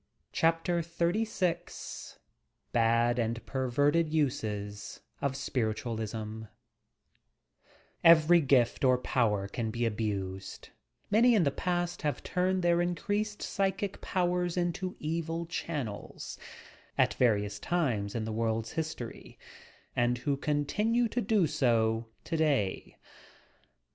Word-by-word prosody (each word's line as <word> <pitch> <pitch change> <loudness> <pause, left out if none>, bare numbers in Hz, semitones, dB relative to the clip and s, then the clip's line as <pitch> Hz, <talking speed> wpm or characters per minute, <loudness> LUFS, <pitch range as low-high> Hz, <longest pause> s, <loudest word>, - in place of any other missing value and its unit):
CHAPTER 165 +1 +2
XXX 175 +2 -2
VI - - -32 0.5
BAD 115 +1 +3
AND 115 0 -2
PERVERTED 145 +5 +1
USES 105 -9 -2 0.2
OF 140 -1 0
SPIRITUALISM 110 -3 -3 1.6
EvEBY 170 0 +7
gift 125 -2 +3
or 130 -1 +5
power 105 -6 +1
can 110 +2 -3
be 120 +2 -1
abused; 100 -4 -3 0.4
many 235 +3 +6
in 200 - +4
the 140 - +2
part 175 +3 -1
tiave 150 -2 -2
turned 185 0 0
their 175 0 +3
increased 205 +4 -1
psychic 195 0 -1
powers 180 -1 0
into 180 +1 -1
evil 165 +1 -2
channels 145 -10 -5 0.6
(at - - +3
various 105 -4 +1
times 120 -11 -1
in 110 -2 -1
the 110 - -3
world's 115 0 -1
history) 155 -7 -5 0.6
and 120 0 +2
who 140 +3 0
continue 210 - +1
to 245 - -1
do 205 -3 +3
so 115 -5 +1 0.2
today. 150 - 0
145 Hz, 110 wpm, -30 LUFS, 115-175 Hz, 1.6 s, EvEBY